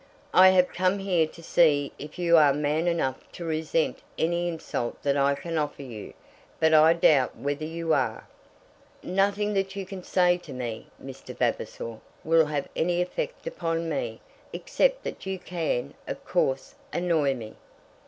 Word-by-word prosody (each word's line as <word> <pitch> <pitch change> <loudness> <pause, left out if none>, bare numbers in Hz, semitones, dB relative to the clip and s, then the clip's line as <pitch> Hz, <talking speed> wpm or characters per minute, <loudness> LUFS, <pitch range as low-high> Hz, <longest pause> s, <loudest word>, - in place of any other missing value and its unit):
"I 185 +1 +8
have 180 -1 +3
come 185 +2 +1
here 180 -5 +1
to 165 +1 -14
see 150 -5 +3
if 150 +1 -9
you 170 -1 +4
are 145 -4 +6
man 150 +3 0
enough 145 -7 0
to 170 - -7
resent 160 0 0 0.2
any 170 +2 0
insult 160 -7 -4
that 140 -1 +2
I 140 0 +3
can 165 +2 -3
offer 145 -1 -3
you; 115 -6 -9 0.4
but 160 0 +4
I 155 +1 +7
doubt 150 -6 +3
whether 145 +2 -3
you 165 0 -1
are." - - -1 0.8
"Nothing 200 +3 +1
that 195 -1 -1
you 195 -1 -4
can 190 -1 -8
say 180 -1 +3
to 155 -5 -10
me, 120 -3 -5
Mr. - - -10
Vavasor, 115 -1 -2 0.2
will 160 -1 +4
have 145 -2 -2
any 175 +1 +1
effect 485 - -3
upon 165 - -2
me; - - -3 0.3
except - - 0
that - - -6
you 190 0 -2
can, 170 -8 -3
of - - -6
course, 135 0 0 0.2
annoy 160 -6 +1
me." 110 -3 -8
165 Hz, 165 wpm, -26 LUFS, 145-180 Hz, 0.8 s, I